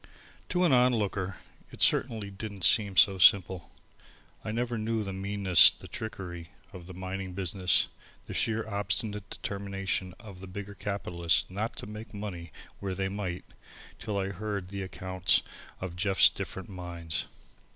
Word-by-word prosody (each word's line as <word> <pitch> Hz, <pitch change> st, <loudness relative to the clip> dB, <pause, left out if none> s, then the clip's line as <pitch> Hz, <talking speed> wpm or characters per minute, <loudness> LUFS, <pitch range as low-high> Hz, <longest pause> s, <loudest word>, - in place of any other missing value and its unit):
To 180 Hz, 0 st, +1 dB
an 170 Hz, -, +4 dB
onlooker 105 Hz, -7 st, +2 dB, 0.3 s
it -, -, -13 dB
certainly 110 Hz, -6 st, +3 dB
didn't 100 Hz, -1 st, -7 dB
seem 100 Hz, -2 st, +3 dB
so 95 Hz, -1 st, +6 dB
simple. 95 Hz, -1 st, +5 dB, 0.7 s
I 110 Hz, -, -3 dB
never 120 Hz, +1 st, -1 dB
knew 110 Hz, 0 st, -1 dB
the 95 Hz, -1 st, -5 dB
meanness, 95 Hz, -2 st, +6 dB
the -, -, -11 dB
trickery, 85 Hz, -6 st, -6 dB, 0.2 s
of 90 Hz, -2 st, -10 dB
the 95 Hz, -, -9 dB
mining 95 Hz, 0 st, -5 dB
business, 95 Hz, 0 st, +2 dB, 0.4 s
the -, -, -7 dB
sheer 115 Hz, 0 st, 0 dB
obstinate 105 Hz, 0 st, -2 dB
determination 95 Hz, -2 st, -3 dB
of 100 Hz, -5 st, -11 dB
the 95 Hz, -, -9 dB
bigger 100 Hz, +2 st, -7 dB
capitalists 90 Hz, -5 st, 0 dB
not 110 Hz, +5 st, -3 dB
to -, -, -6 dB
make 105 Hz, +1 st, -9 dB
money 90 Hz, -6 st, -6 dB, 0.3 s
when 95 Hz, -2 st, -3 dB
they 95 Hz, +1 st, -1 dB
might, 95 Hz, -3 st, -4 dB, 0.5 s
till 105 Hz, -2 st, -3 dB
I 95 Hz, 0 st, -1 dB
heard 100 Hz, -1 st, -4 dB
the 100 Hz, 0 st, -5 dB
accounts 95 Hz, -1 st, +1 dB, 0.4 s
of 95 Hz, -2 st, -5 dB
Jeff's 95 Hz, +2 st, +5 dB
different 95 Hz, -, -6 dB
mines. 85 Hz, -3 st, -4 dB
95 Hz, 150 wpm, -29 LUFS, 95-105 Hz, 0.7 s, so